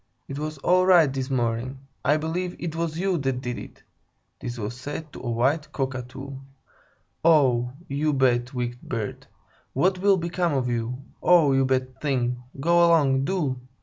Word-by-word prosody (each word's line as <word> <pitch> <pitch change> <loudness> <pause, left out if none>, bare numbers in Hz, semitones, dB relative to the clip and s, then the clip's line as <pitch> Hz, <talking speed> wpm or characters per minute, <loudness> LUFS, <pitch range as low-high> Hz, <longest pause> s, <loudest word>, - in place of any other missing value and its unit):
It 135 +1 -5
was 155 0 -4
all 185 +5 +3
right 165 -7 +6
this 135 0 -3
morning! 120 0 -1 0.3
I 145 +3 +3
believe 175 +3 -3
it 165 -2 -4
was 165 -1 -2
you 185 -1 0
that 135 -2 -1
did 125 -2 -4
it!" - - -12 0.6
(this 120 0 -5
was 110 +1 -4
said 145 +4 -7
to - - -8
a 120 - -4
white 140 +6 +1
Cockatoo). 135 0 -4 0.9
"Oh, 130 -7 +4 0.2
you 145 +2 0
bad, 125 -3 +2
wicked 120 -1 -4
bird! 115 -4 -5 0.5
What 185 +7 +2
will 195 0 +4
become 170 -1 -1
of 130 -2 0
you? 120 +2 -3 0.2
Oh, 170 -5 +5
you 135 0 +3
bad 130 -1 -1
thing! 125 -4 0 0.2
Go 170 +4 +4
along, 140 -6 +4
do! 140 -8 -1
135 Hz, 165 wpm, -25 LUFS, 125-165 Hz, 0.9 s, right